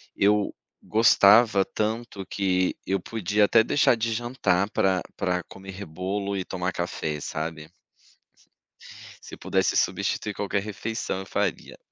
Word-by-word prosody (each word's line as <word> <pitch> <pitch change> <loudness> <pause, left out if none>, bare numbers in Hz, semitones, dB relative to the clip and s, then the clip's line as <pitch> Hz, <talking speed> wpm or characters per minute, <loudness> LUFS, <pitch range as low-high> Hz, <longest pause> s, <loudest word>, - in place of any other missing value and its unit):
eu 105 +1 +2 0.3
gostava 110 -1 +5
tanto, 110 -2 -3
que 95 -2 0
eu 95 +1 0
podia 105 +1 +1
até 110 +2 +5
deixar 130 +1 +3
de 115 0 -1
jantar 110 -5 0
para 95 -3 +1 0.2
para 90 -1 -1
comer 95 +2 -10
bolo 100 +5 -3
e 95 - -3
tomar 90 0 -3
café, 75 -3 -3
sabe? 80 +1 -5 1.6
Se - - -10
pudesse - - 0
substituir 105 - 0
qualquer 100 0 -1
refeição, 105 -1 -4
eu - - -7
faria. 100 -3 -3
100 Hz, 125 wpm, -25 LUFS, 90-110 Hz, 1.6 s, gostava